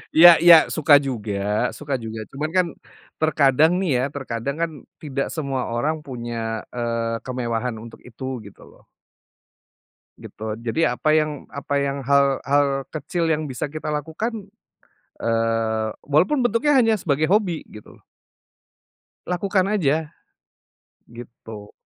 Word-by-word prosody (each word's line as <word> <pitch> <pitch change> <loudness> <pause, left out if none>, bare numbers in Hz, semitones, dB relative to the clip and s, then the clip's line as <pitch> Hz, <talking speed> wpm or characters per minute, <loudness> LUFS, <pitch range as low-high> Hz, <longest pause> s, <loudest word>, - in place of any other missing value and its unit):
Iya 175 +2 +10
iya 175 -1 +10 0.2
suka 155 -1 +4
juga 110 -5 -3 0.4
suka 145 -1 -4
juga. 110 0 -6
Cuman 150 +3 -3
kan, 180 - +4 0.6
terkadang 155 0 +4
nih 190 - -1
ya, 125 - 0
terkadang 135 0 -4
kan, 165 -1 0 0.3
tidak 140 -2 -3
semua 140 -5 -2
orang 145 +7 0
punya, 120 -3 -6 0.4
eee, 115 -1 -2
kemewahan 125 -1 -2
untuk 115 - -12
itu, 125 +2 -11 0.2
gitu 100 - -14
loh. - - -21 1.4
Gitu. 110 - -10 0.2
Jadi 120 +8 -1
apa 140 +5 +1
yang 155 -2 0
apa 140 +1 -5
yang 140 0 -1
hal 140 0 +2
hal 140 -1 +1
kecil 165 +2 -2
yang 155 -1 0
bisa 135 0 -4
kita 155 0 -4
lakukan, 195 - -4 0.7
eee, 115 -1 0 0.2
walaupun 160 - +3
bentuknya 245 +4 +2
hanya 235 -6 +4
sebagai 155 -5 0
hobi, 185 -3 0
gitu 105 - -14
loh - - -33 1.2
lakukan 185 +1 0
aja! 155 -4 +1 1.0
Gitu. 115 -3 -11
140 Hz, 130 wpm, -22 LUFS, 120-160 Hz, 1.4 s, Iya